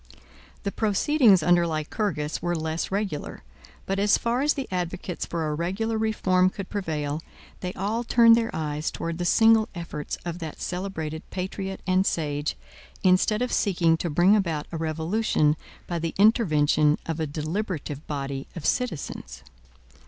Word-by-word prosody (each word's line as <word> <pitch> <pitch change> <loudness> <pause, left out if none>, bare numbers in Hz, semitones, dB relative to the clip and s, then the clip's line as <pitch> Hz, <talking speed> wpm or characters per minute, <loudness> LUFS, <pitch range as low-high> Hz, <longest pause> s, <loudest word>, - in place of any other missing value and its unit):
The 200 - -1
proceedings 215 - +3
under 175 0 +4
Lycurgus 155 0 -2
were 175 0 0
less 160 0 -2
regular; 195 -6 -3 0.4
but 195 0 -1
as 205 +2 +4
far 235 +2 0
as 295 +1 +2
the 275 -3 -4
advocates 180 0 -3
for 165 -2 -2
a 150 - -1
regular 195 +8 -1
reform 185 -4 +2
could 195 0 -7
prevail, 155 -6 -2 0.4
they 180 - -3
all 210 +5 -2
turned 230 -1 +6
their 230 0 0
eyes 150 0 -2
towards 165 0 -4
the 175 - -1
single 225 +4 +5
efforts 165 -3 -5
of 170 0 -4
that 160 -3 -7
celebrated 160 -4 -4
patriot 190 +1 -4
and 185 +1 +2
sage, 145 - -1 0.5
instead 190 +5 +3
of 250 - -2
seeking 175 -5 +3
to 170 - -2
bring 175 +7 +5
about 165 -7 0
a 165 - -3
revolution 160 0 +1 0.3
by 170 -1 -3
the 165 0 -3
intervention 155 -8 +4
of 165 0 -3
a 160 - -1
deliberative 155 -1 -4
body 140 -2 -4
of 170 - -6
citizens. 140 - -2
175 Hz, 150 wpm, -26 LUFS, 155-205 Hz, 0.5 s, turned